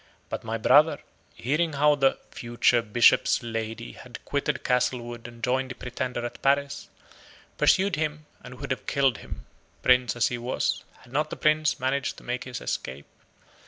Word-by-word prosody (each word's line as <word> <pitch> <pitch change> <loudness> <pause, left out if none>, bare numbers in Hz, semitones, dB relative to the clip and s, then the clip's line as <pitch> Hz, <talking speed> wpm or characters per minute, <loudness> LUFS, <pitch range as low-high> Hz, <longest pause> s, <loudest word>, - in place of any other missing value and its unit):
But - - -4
my 115 0 -3
brother, 145 +8 +5 0.4
hearing 155 +6 0
how 150 +1 +4
the 135 -2 +2
FUTURE 120 0 +2
BISHOP'S 115 +2 +4
LADY 115 - -4
had - - -12
quitted - - -1
Castlewood 120 -2 -1
and 120 -1 -14
joined 130 +1 0
the 130 - -6
Pretender 125 -1 -4
at 120 - -7
Paris, 140 +1 0 0.7
pursued 190 -1 +3
him, 155 -1 -2 0.2
and 125 0 -10
would 140 -2 -5
have 130 - -3
killed 135 -5 +2
him, - - -9 0.4
Prince 125 -1 +4
as 115 -4 +2
he 120 - -4
was, 125 +2 -1 0.2
had 125 - -17
not 150 +2 0
the - - -5
Prince 155 -1 +2
managed 130 +1 -1
to - - -13
make 125 +1 -3
his 125 -2 -6
escape. 65 +2 -4
125 Hz, 165 wpm, -26 LUFS, 120-140 Hz, 0.7 s, brother